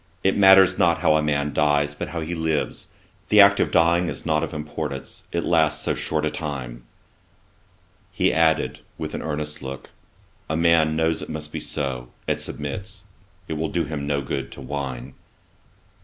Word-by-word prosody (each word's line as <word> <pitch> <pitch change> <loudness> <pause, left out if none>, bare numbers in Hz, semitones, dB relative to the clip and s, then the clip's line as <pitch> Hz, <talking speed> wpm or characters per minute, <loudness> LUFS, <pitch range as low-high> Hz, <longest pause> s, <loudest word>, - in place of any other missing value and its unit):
It 95 - +3
matters 95 -2 +6
not 85 -3 +3
how 75 - +4
a 80 - +3
man 75 -1 0
dies, 75 0 +2
but 75 - -5
how 80 +1 -4
he 80 +2 -4
lives. 80 -2 -2 0.4
The 105 - +5
act 100 0 +7
of - - +2
dying 85 +1 +3
is - - -7
not 80 -1 +1
of 80 - -3
importance, 75 -3 -6
it 85 - -1
lasts 80 -2 +2
so - - 0
short 80 -1 -2
a 75 - -1
time.' 65 -7 -6 1.3
He - - +1
added, 80 -1 +2 0.2
(with 75 -1 -5
an - - -4
earnest 75 -1 -3
look,) 65 0 -8 0.6
'A 80 - 0
man 80 -2 +3
knows 80 0 +1
it - - -7
must 75 -1 -6
be - - -4
so, 65 -4 -3 0.2
and - - 0
submits. 90 +6 -5 0.4
It - - -3
will 80 0 -1
do 85 - 0
him 75 -2 -4
no 70 -1 0
good - - -4
to - - -10
whine.' 65 -2 -5
80 Hz, 180 wpm, -23 LUFS, 75-85 Hz, 1.3 s, act